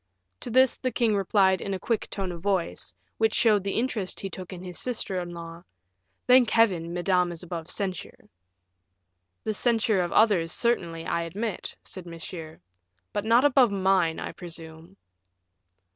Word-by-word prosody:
To -, -, -4 dB
this 260 Hz, +2 st, +4 dB
the 255 Hz, -, -2 dB
king 225 Hz, -2 st, +2 dB
replied 190 Hz, -1 st, +3 dB
in 195 Hz, -1 st, -2 dB
a -, -, -5 dB
quick 225 Hz, +1 st, -1 dB
tone 195 Hz, -2 st, -3 dB
of 170 Hz, -1 st, -8 dB
voice, 175 Hz, -, -1 dB, 0.2 s
which 220 Hz, -1 st, +2 dB
showed 215 Hz, -4 st, +4 dB
the 195 Hz, -, -2 dB
interest 225 Hz, -5 st, -2 dB
he 195 Hz, -, -4 dB
took 185 Hz, +1 st, -8 dB
in 185 Hz, -1 st, -8 dB
his 180 Hz, -2 st, -5 dB
sister 220 Hz, -6 st, -1 dB
in 175 Hz, -1 st, -5 dB
law, 170 Hz, 0 st, -8 dB, 0.6 s
"Thank 250 Hz, -2 st, +6 dB
Heaven, 185 Hz, -8 st, +2 dB
Madame 180 Hz, 0 st, +1 dB
is 170 Hz, +1 st, -8 dB
above 170 Hz, -2 st, -6 dB
censure." 190 Hz, -2 st, -4 dB, 1.2 s
"The 215 Hz, -, -1 dB
censure 225 Hz, -3 st, +2 dB
of 175 Hz, -, -2 dB
others, 195 Hz, -7 st, +3 dB
certainly, 170 Hz, -9 st, 0 dB
I 170 Hz, -, 0 dB
admit," 195 Hz, +5 st, -4 dB
said 185 Hz, -2 st, -9 dB
Monsieur; 165 Hz, -1 st, -8 dB, 0.5 s
"but 205 Hz, -, -2 dB
not 235 Hz, +4 st, +5 dB
above 265 Hz, -4 st, +5 dB
mine, 190 Hz, -4 st, +2 dB
I -, -, -4 dB
presume." 165 Hz, +1 st, -10 dB
190 Hz, 160 wpm, -27 LUFS, 170-220 Hz, 1.2 s, Thank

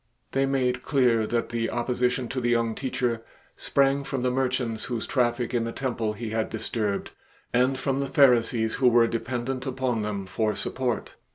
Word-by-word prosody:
They 135 Hz, 0 st, +1 dB
made 125 Hz, -2 st, +1 dB
clear 125 Hz, -6 st, +2 dB
that 120 Hz, 0 st, -1 dB
the 115 Hz, -1 st, -1 dB
opposition 125 Hz, +1 st, 0 dB
to 130 Hz, -1 st, -2 dB
the 120 Hz, -, +1 dB
young 115 Hz, -1 st, +2 dB
Teacher 125 Hz, -2 st, -1 dB, 0.3 s
sprang 140 Hz, 0 st, +2 dB
from 135 Hz, -2 st, -3 dB
the 125 Hz, -, +2 dB
merchants 125 Hz, -3 st, -1 dB
whose 120 Hz, -3 st, -3 dB
traffic 120 Hz, -1 st, 0 dB
in 120 Hz, -2 st, +1 dB
the 115 Hz, -, -3 dB
temple 115 Hz, -4 st, -2 dB
He 110 Hz, +1 st, -5 dB
had 110 Hz, 0 st, -1 dB
disturbed 110 Hz, -2 st, -2 dB, 0.4 s
and 130 Hz, +2 st, +3 dB
from 135 Hz, 0 st, -1 dB
the 140 Hz, -, -1 dB
Pharisees 120 Hz, -4 st, +4 dB
who 130 Hz, -, +6 dB
were 120 Hz, -1 st, +6 dB
dependent 125 Hz, +3 st, -3 dB
upon 130 Hz, -3 st, -1 dB
them 105 Hz, -2 st, -3 dB
for 105 Hz, +2 st, -1 dB
support. 125 Hz, +2 st, -2 dB
120 Hz, 175 wpm, -26 LUFS, 115-130 Hz, 0.4 s, who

